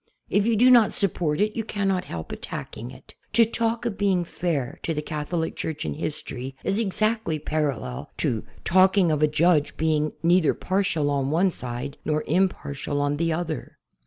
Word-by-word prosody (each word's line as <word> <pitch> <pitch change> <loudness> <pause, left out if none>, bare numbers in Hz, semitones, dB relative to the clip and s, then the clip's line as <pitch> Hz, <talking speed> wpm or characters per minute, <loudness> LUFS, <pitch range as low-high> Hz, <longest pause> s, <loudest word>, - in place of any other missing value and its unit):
If 205 +1 +3
you 230 - +3
do 250 +4 +6
not 235 -4 +6
support 175 -8 0
it 210 +1 +1
you 225 - -1
cannot 195 -3 -1
help 80 - -6
attacking - - -6
it. - - -14 0.2
To 230 - +6
talk 230 +1 -1
of 220 -5 -3
being 190 -4 +2
"fair" 155 -7 -2
to 165 - -2
the 150 - -1
Catholic 160 +2 -3
Church 160 - -4
in 75 - -2
history 135 - -5
is 195 - +1
exactly 215 -4 +1
parallel 145 - -2
to 110 -3 0 0.2
talking 185 -1 +4
of 150 -1 0
a 155 - +5
judge 155 0 +2
being 155 -1 +1
"neither 175 -1 +4
par 190 +2 0
tial 155 -6 0
on 140 -1 0
one 180 +5 +3
side 125 +1 -6
nor 155 0 0
impartial 150 -5 0
on 145 0 0
the 165 +1 +1
other." 160 -1 -4
165 Hz, 180 wpm, -25 LUFS, 145-195 Hz, 0.2 s, do